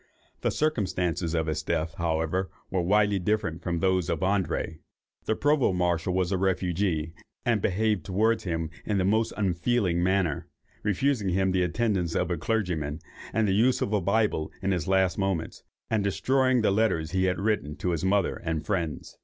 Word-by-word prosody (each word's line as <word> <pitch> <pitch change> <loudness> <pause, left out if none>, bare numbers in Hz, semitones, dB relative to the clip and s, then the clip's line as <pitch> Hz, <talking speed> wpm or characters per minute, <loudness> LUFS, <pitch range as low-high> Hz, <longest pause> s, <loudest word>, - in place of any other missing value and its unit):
The - - +1
circumstances 90 - 0
of 80 -1 +1
his 80 -1 -2
death, 80 -1 -1
however, 85 +3 0 0.2
were 95 - +1
widely 100 +2 +3
different 90 -4 -1
from 85 0 -2
those 95 -3 +1
of 80 - -1
André. 95 -4 0 0.5
The 110 - +1
Provost 140 -10 +2
marshal 90 0 0
was 95 -1 +1
a 95 - +1
refugee, 90 -3 0 0.3
and 115 -4 +2
behaved 105 +1 +1
towards 110 +4 +1
him 80 -4 -2
in 105 - -1
the 95 - +1
most 110 +3 +2
unfeeling 95 -1 +1
manner, 90 -4 +1 0.3
refusing 110 +1 +1
him 95 +1 +1
the 95 0 +1
attendance 90 -2 0
of 90 0 0
a 85 - 0
clergyman, 80 -7 -1 0.3
and 110 -1 +1
the 95 - +2
use 120 +6 +3
of 105 - -1
a 105 - +2
Bible 100 -4 +1
in 100 - +1
his 90 -4 -1
last 95 -1 +2
moments, 95 -4 -2 0.3
and 110 -2 +2
destroying 130 +4 +2
the 105 - +3
letters 95 -7 +1
he 95 0 +1
had 90 -1 0
written 100 -8 -1
to 90 - -2
his 85 -1 -2
mother 95 0 +2
and 80 -2 -3
friends. 85 -7 -3
95 Hz, 180 wpm, -27 LUFS, 85-105 Hz, 0.5 s, widely